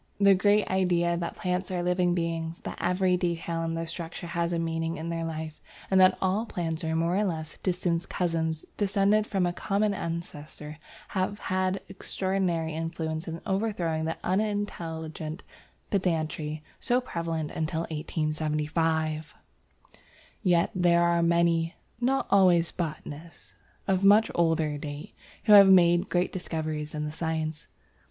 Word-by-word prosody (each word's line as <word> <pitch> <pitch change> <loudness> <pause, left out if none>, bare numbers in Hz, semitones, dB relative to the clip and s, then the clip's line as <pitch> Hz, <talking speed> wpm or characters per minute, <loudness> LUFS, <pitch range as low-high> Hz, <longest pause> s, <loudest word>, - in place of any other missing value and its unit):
The 200 -1 +7
great 205 +2 +3
ideas 175 -2 +1
that 170 - -4
plants 180 0 -2
are 180 -2 -2
living 180 0 +2
beings, 165 -1 -2
that - - -6
every 180 0 +2
detail 170 -1 -2
in 165 0 -2
their 165 0 -2
structure 165 +1 -6
has 170 0 -1
a 170 - 0
meaning 165 0 -2
in 160 +2 -5
their 165 0 -2
life, 160 -1 -5 0.3
and 190 -1 +6
that 185 0 +6
all 195 +5 0
plants 165 -3 -3
are 160 0 -1
more 165 +2 +1
or 210 - +2
less 160 -5 -4
distant 175 -2 -1
cousins 160 -3 -1
descended 205 +1 +2
from 190 -3 +1
a 175 - 0
common 205 +3 0
ancestor, 155 -3 -6 0.3
have 190 +1 -1 0.2
had 185 +1 0
extraordinary 185 -4 -2
influence 160 +1 -3
in 165 0 -5
overthrowing 190 -6 -1
the 165 - -2
unintelligent 170 -5 -2 0.5
pedantry 155 -5 -1 0.2
so 245 +1 +2
prevalent 165 -9 -3
until 160 0 -2
1875. 155 0 -1 1.1
Yet 175 -2 +3
there 175 -2 +3
were 170 0 +3
many, 170 -1 +2 0.2
not 265 +2 +1
always 180 -4 +5
botanists, 165 -1 -7 0.3
of 190 0 +1
much 205 +3 +6
older 160 -3 +1
date, 145 0 -7 0.3
who 205 -2 +9
made 175 -2 +5
great 180 0 +1
discoveries 155 -4 -4
in 150 0 -2
the 150 - -4
science. 160 -1 -3
170 Hz, 140 wpm, -28 LUFS, 160-185 Hz, 1.1 s, who